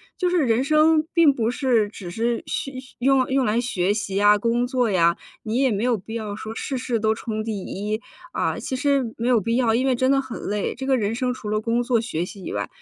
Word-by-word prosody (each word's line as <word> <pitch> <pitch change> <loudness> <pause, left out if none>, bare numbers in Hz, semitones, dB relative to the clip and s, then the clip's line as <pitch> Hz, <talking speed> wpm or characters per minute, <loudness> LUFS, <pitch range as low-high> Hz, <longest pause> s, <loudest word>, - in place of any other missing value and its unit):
就 360 -1 0
是 360 - +3
人 230 +3 +2
生 310 +2 +4
并 330 -3 +6
不 230 -1 0
是 245 -5 +1
只 190 -4 -9
是 230 +5 -1
学 275 - -3 0.3
用 265 0 +2
用 265 -1 +2
来 225 +3 +1
学 195 -5 0
习 200 -2 -3
呀， 205 +1 +5
工 235 +3 +1
作 250 -2 0
呀、 170 -3 +3 0.3
你 225 +1 -2
也 265 0 +3
没 205 +2 -1
有 245 -2 +2
必 220 +3 -8
要 215 -3 -4
说 220 +1 -7
事 270 - -3
事 245 -3 -1
都 220 0 +2
冲 220 -1 -4
第 215 -3 -3
1， 210 +3 -3 0.3
啊， - - -1
其 260 - -4
实 275 -4 +1
没 235 - -2
有 245 -2 +4
必 230 +3 -1
要， 235 -3 +2
因 255 +3 +1
为 265 - +3
真 260 +2 +1
的 275 - +4
很 260 -3 -6
累。 205 0 -2
这 265 +2 -6
个 265 -1 +3
人 210 -1 -1
生 250 +2 -1
除 210 -3 -7
了 215 0 0
工 235 +2 0
作 240 -2 +1
学 175 -8 -3
习 190 +1 -10
以 - - -5
外， - - -2
230 Hz, 260 characters per minute, -23 LUFS, 215-260 Hz, 0.3 s, 并